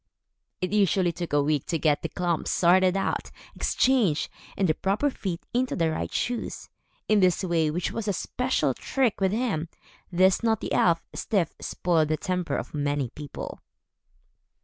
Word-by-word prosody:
It 185 +2 -2
usually 190 -3 +3
took 175 0 -5
a 145 -1 +3
week 145 -1 0
to 165 - 0
get 150 -2 +2
the 165 - -3
klomps 175 -1 -1
sorted 185 +2 +4
out, 195 - -1 0.3
exchanged, 230 - +2 0.3
and 195 - +2
the 155 - +3
proper 200 - 0
feet 185 -8 -5
into 250 +1 +1
the 165 -2 +1
right 85 - -3
shoes. 245 -1 -3 0.4
In 215 -1 +4
this 185 0 +3
way, 165 -4 +1
which 170 +4 -2
was 225 -2 -4
a - - +3
special 250 +7 0
trick 255 -7 0
with 190 -1 +3
him, 205 -8 -1 0.4
this 185 +1 +4
naughty 225 -2 0
elf, 170 -1 +3
Styf, 190 -7 0
spoiled 165 -3 +1
the 155 +1 0
temper 180 0 -2
of - - -6
many 145 -3 -1
people. 145 -1 -7
180 Hz, 165 wpm, -26 LUFS, 160-205 Hz, 0.4 s, sorted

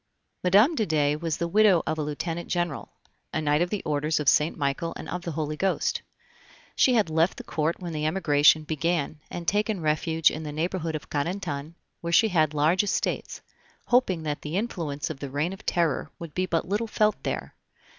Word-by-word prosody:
Mme. 205 - +5
de 225 -8 0
Dey 150 -2 +2
was 160 0 -2
the 170 - -1
widow 200 -1 +4
of 160 0 -2
a - - +1
Lieutenant 165 +3 -4
General, 175 -5 -2 0.4
a - - -1
Knight 150 0 +2
of 175 - +1
the 210 0 -3
Orders 150 +1 0
of 150 - -3
Saint 150 +3 +3
Michael 145 +3 -1
and - - -7
of 180 - -4
the 170 -2 -5
Holy 155 0 -2
Ghost. 190 +4 0 0.7
She 255 - +4
had 210 -8 +2
left 165 +3 +2
the - - -7
Court 160 +2 -1
when 175 -3 -5
the 155 0 -1
Emigration 155 -2 +4
began, 155 0 -1
and 170 -1 -6
taken 210 +1 +1
refuge 160 0 +2
in 155 - -5
the 150 -1 -5
neighborhood 165 +1 -2
of 150 - -7
Carentan, 155 -1 -3 0.2
where 170 - -4
she 220 +6 +5
had 155 -5 +2
large 160 +7 +3
estates, 205 - -2 0.4
hoping 195 -10 +2
that 150 -1 -3
the 155 +4 -3
influence 160 -10 -3
of 140 - -8
the 140 - -5
Reign 150 +7 -1
of 195 - -12
Terror 165 -3 +1
would 170 -3 -8
be 185 0 -1
but 165 -2 -1
little 210 +4 -1
felt 215 0 +1
there. - - -4
165 Hz, 200 wpm, -26 LUFS, 150-185 Hz, 0.7 s, Mme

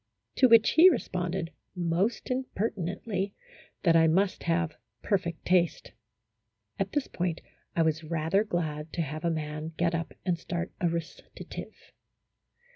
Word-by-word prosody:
To 260 - +7
which 230 -1 +7
he 340 +4 +8
responded, 180 - -2 0.2
most 180 +8 0
impertinently, 200 -5 -2 0.5
that 165 -2 +5
I 165 0 +6
must 185 +4 +2
have 165 -2 +1 0.3
per 200 - +2
fect 170 -2 -7
taste. 175 -2 +2 0.9
At 195 0 -1
this 290 - +1
point 175 -2 -2 0.4
I 165 - +4
was 160 0 0
rather 165 +5 +1
glad 160 -6 -3
to 170 - 0
have 155 +1 -5
a 170 - +2
man 155 0 -3
get 170 0 +1
up 165 0 -3
and 175 -2 +1
start 175 +1 -3
a 175 - +3
recitative. 170 0 -7
170 Hz, 140 wpm, -29 LUFS, 165-195 Hz, 0.9 s, he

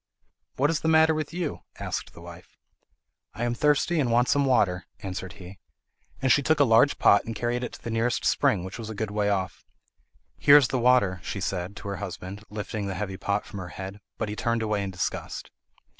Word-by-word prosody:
"What 145 +4 +2
is 160 - 0
the - - -2
matter 160 0 +5
with 155 -1 -3
you?" 170 -3 -3 0.2
asked - - -4
the - - -13
wife. - - -13 0.8
"I 110 - -3
am 120 0 0
thirsty 150 +6 +2
and 130 -5 +1
want 120 +2 +3
some 140 0 +3
water," 95 -9 +2
answered 95 -1 -5
he; 95 +1 -12 0.6
and 130 - +4
she 140 - +5
took 155 +2 +2
a - - +7
large 115 +3 +4
pot 100 - +5
and 115 - -6
carried 120 +3 -1
it 125 - -5
to - - -12
the 115 - -4
nearest 115 +2 0
spring, 90 - +2
which 95 +5 -7
was 110 -1 -6
a 110 - -6
good 105 0 -3
way 105 0 0
off. 95 -2 -2 0.8
"Here 145 0 +8
is 135 -4 +4
the 130 - 0
water," 120 -7 +3
she 100 - -5
said 90 +1 -3
to - - -8
her 100 -1 -3
husband, 95 +1 -7
lifting 105 0 -4
the 95 - -3
heavy 95 0 -4
pot 100 +2 -1
from 100 - -8
her 90 -1 -6
head; 95 +2 -7 0.2
but - - -2
he 105 - -4
turned 115 +1 0
away 105 -2 0
in 100 - -3
disgust. 95 0 -4
110 Hz, 220 wpm, -26 LUFS, 100-125 Hz, 0.8 s, Here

